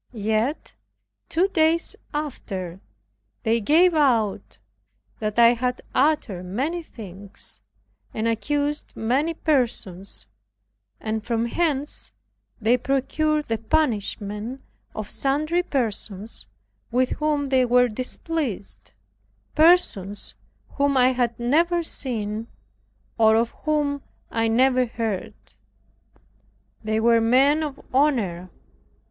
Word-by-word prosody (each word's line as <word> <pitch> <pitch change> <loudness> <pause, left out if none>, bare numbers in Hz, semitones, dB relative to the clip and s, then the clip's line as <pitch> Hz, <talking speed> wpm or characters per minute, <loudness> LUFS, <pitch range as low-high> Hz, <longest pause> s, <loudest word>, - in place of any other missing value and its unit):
Yet, 220 +6 -1 0.6
two 350 +4 +2
days 330 -1 +2 0.2
after 195 - -5 0.6
they 225 +1 +2
gave 335 - +5
out 240 -10 +1 0.6
that 215 0 -3
I 235 0 +7
had 250 +1 -2
uttered 260 - +1
many 275 - -2
things, 200 - -7 0.5
and 220 +1 -2
accused 290 +6 -1
many 275 +9 0
persons; 200 - 0 0.7
and 220 0 -3
from 230 0 0
hence 295 +2 -1 0.5
they 230 +2 +3
procured 300 +4 0
the 225 -1 -1
banishment 225 -3 -1 0.3
of 215 -1 -4
sundry 305 +8 0
persons 220 - -3 0.4
with 250 +2 +1
whom 295 -2 0
they 260 -1 +4
were 245 0 +4
displeased, 255 - -4 0.6
persons 305 - +3 0.4
whom 280 -1 +2
I 255 0 +6
had 245 -2 -1
never 335 +8 +2
seen 225 -7 -4 0.7
or 220 -1 +6
of 230 +1 +2
whom 295 -2 +1 0.3
I 225 0 +1
never 255 +2 +3
heard. 225 -4 -3 1.5
They 220 0 0
were 230 0 +4
men 270 +7 +4
of 290 -3 -4
honor. 220 - +1
250 Hz, 100 wpm, -24 LUFS, 220-295 Hz, 1.5 s, I